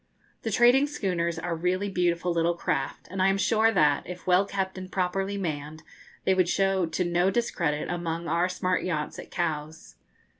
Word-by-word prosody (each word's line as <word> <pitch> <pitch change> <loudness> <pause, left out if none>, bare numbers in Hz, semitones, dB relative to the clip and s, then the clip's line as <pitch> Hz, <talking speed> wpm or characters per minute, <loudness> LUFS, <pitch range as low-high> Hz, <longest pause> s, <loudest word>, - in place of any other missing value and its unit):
The 225 - -3
trading 245 +6 +5
schooners 175 - -2
are 165 +1 -2
really 180 +4 0
beautiful 175 -2 0
little 170 +1 +1
craft, 135 -5 -2
and 190 0 -2
I 190 - +5
am 195 0 +2
sure 225 +2 +3
that, 150 -8 +3
if 180 0 -8
well 185 +2 +3
kept 190 -1 -2
and 185 0 -8
properly 195 +2 -1
manned, 155 -3 -4 0.4
they 190 - +4
would 185 -2 +2
show 195 -2 +2
to 160 +3 -1
no 175 +2 +2
discredit 170 -9 -1
among 170 -1 -3
our 175 +2 +1
smart 185 0 -1
yachts 155 -5 -3
at - - -9
Cowes. 160 -2 -4
180 Hz, 180 wpm, -27 LUFS, 165-195 Hz, 0.4 s, trading